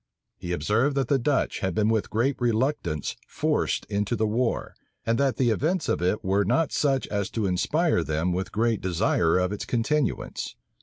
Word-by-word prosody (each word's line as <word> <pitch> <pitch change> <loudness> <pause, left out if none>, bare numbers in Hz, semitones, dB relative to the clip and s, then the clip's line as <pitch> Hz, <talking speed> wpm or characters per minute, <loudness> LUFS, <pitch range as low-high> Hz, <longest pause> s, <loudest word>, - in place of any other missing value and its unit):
He 90 - -5
observed, 105 - +1
that 135 -3 0
the 140 - +3
Dutch 140 +3 0
had 95 -3 -2
been 105 -1 +2
with 110 -2 +1
great 125 +5 +1
reluctance 115 - 0
forced - - 0
into 105 +3 -1
the 110 - +1
war, 115 +3 -1 0.3
and 115 0 +1
that 135 -5 +1
the 125 -3 +3
events 160 - 0
of - - 0
it 90 +4 0
were 100 +2 +2
not 125 - +1
such 135 -3 +1
as 100 -2 -1
to 110 -3 -2
inspire 95 - +1
them 80 +3 -1
with 95 +2 -3
great 115 0 +1
desire 90 -2 +2
of 90 0 +1
its 105 - -4
continuance. 135 +5 -1
110 Hz, 185 wpm, -26 LUFS, 95-130 Hz, 0.3 s, the